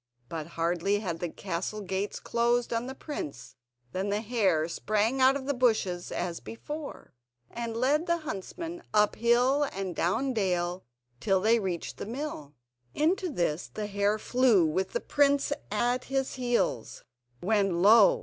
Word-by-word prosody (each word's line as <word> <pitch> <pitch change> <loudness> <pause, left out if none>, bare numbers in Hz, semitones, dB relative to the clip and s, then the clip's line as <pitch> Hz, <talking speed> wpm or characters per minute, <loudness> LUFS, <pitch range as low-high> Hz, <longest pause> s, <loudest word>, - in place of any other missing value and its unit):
But 160 -2 -5
hardly 175 +4 +1
had 170 -5 -3
the 175 - -2
castle 190 +4 -4
gates 195 +1 -3
closed 240 0 +1
on 230 +2 -1
the 265 - -6
prince 135 - -7 0.4
than 190 +2 -2
the 205 +1 0
hare 200 -9 +1
sprang 215 +8 0
out 260 +1 +6
of 275 -2 -4
the 285 - 0
bushes 220 -8 +1
as 175 -2 -3
before, 295 +6 -8 0.4
and 230 -1 -4
led 290 +7 +2
the 340 0 +2
huntsman 330 - -6
up 210 0 +4
hill 245 +5 +3
and 190 -2 -4
down 250 +10 0
dale, 180 -4 -1 0.3
till 195 +3 +2
they 225 +4 +4
reached 185 -5 -3
the - - -6
mill. 230 - -5 0.4
Into 360 +4 +1
this 175 - -1
the 215 - -4
hare 205 +1 +1
flew 235 -5 +3
with 175 +5 -1
the 485 - -1
prince 285 0 +2 0.2
at 245 +4 0
his 270 0 -1
heels, 245 - -1 0.4
when, 195 -3 +1
lo! 235 - +7
215 Hz, 155 wpm, -29 LUFS, 185-260 Hz, 0.4 s, lo